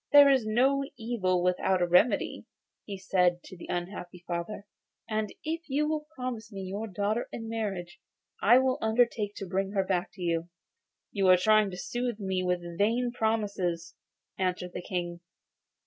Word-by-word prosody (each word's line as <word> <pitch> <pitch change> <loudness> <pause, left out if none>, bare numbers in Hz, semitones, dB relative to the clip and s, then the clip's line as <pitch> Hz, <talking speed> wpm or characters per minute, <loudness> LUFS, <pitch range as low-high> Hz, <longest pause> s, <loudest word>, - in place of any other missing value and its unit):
'There 285 -1 +9
is 260 -5 +2
no 265 +5 +3
evil 200 -7 0
without 180 +1 +2
a 175 - +3
remedy,' 180 +7 +2 0.4
he 200 -2 -5
said 180 -2 +2
to - - -11
the 175 - -10
unhappy 175 0 -5
father; 175 +4 -4 0.4
'and 215 -1 -1
if 320 +2 -2
you 295 +3 +1
will 305 -1 -2
promise 240 -3 -5
me 195 -1 -6
your 200 +4 -4
daughter 205 +4 -1
in 225 -1 -6
marriage, 195 -6 -4 0.4
I 235 +5 +7
will 260 0 +2
undertake 220 -2 +1
to 195 - -5
bring 195 +2 -2
her 195 -2 +2
back 185 -2 -1
to 190 - -12
you.' 170 0 -1 0.6
'You 195 -2 +1
are 185 0 +8
trying 215 +2 +4
to 180 - -7
soothe 240 +2 -3
me 190 -2 -1
by 180 0 +2 0.2
vain 235 +4 +2
promises,' 200 -7 -1 0.5
answered 180 -1 -1
the - - -4
King. 175 -1 -3
200 Hz, 165 wpm, -29 LUFS, 180-230 Hz, 0.6 s, There